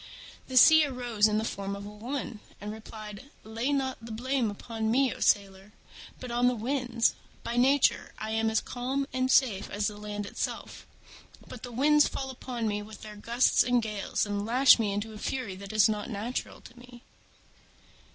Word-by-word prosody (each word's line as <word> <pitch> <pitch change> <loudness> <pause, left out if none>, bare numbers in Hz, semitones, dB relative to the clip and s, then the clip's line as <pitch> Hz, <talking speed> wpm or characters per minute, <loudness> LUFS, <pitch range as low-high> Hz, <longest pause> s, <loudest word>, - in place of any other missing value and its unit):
The 260 - -2
Sea 315 +4 +8
arose 240 -5 +1
in 210 0 0
the 220 - 0
form 200 -2 -4
of 200 0 -8
a - - -7
woman, 235 +1 -5 0.2
and 210 +1 -6
replied, 215 +2 -10
"Lay 225 +5 -2
not 265 -4 -2
the 230 - -8
blame 245 0 -1 0.2
on 225 -2 -2
me, 260 +2 +2
O - - -12
sailor, 195 0 0 0.5
but 250 -2 -7
on 240 +1 +2
the 250 - +2
Winds. 240 0 0 0.3
By 235 - -3
nature 265 +3 +3
I 215 0 -5
am 225 0 +1
as 220 - +1
calm 260 +3 -3
and 255 0 0
safe 230 -8 +3
as 205 +1 -2
the 210 -1 -2
land 205 0 -5
itself: - - -5 0.6
but 245 - -10
the 245 - -8
Winds 295 +5 +4
fall 265 -1 -4
upon 245 -3 -4
me 210 -1 -1
with 210 +1 -11
their 215 -1 -9
gusts 235 +4 +2
and 245 0 +3
gales, 215 -3 -2
and 205 -1 -2
lash 250 +4 +6
me 215 -3 0
into 205 +2 -3
a 210 - -9
fury 245 -7 -3
that 200 +1 -8
is 215 -1 +5
not 210 0 -3
natural 225 +3 -4
to 245 - -15
me." 245 0 -14
230 Hz, 190 wpm, -28 LUFS, 210-255 Hz, 0.6 s, Sea